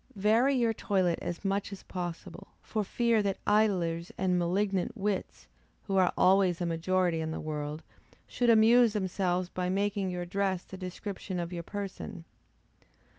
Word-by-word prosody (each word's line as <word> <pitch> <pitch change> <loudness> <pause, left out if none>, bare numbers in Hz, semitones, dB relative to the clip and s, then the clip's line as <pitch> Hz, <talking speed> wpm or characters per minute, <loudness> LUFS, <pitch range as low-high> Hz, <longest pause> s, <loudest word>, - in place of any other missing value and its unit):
Vary 225 +7 +3
your 235 -3 +2
toilet 185 -5 0
as 175 +3 -5
much 195 +1 -1
as 195 - -8
possible, 175 -2 -6 0.2
for 215 -1 -2
fear 230 +2 +2
that 200 -1 -1
idlers 180 -6 +1
and 180 -1 +1
malignant 190 +4 0
wits, 200 -1 -3 0.4
who 195 - -2
are 185 -2 +4
always 185 -2 +4
a 175 - -1
majority 170 0 +1
in 160 - -3
the 160 - -4
world, 150 0 -4 0.4
should 245 -1 0
amuse 230 +1 +6
themselves 185 -2 0
by 180 0 -3
making 200 0 0
your 180 -1 -3
dress 190 0 -1
the - - -10
description 185 0 -5
of 170 +1 -4
your 170 - -3
person. 195 -1 -6
190 Hz, 155 wpm, -30 LUFS, 175-205 Hz, 0.4 s, amuse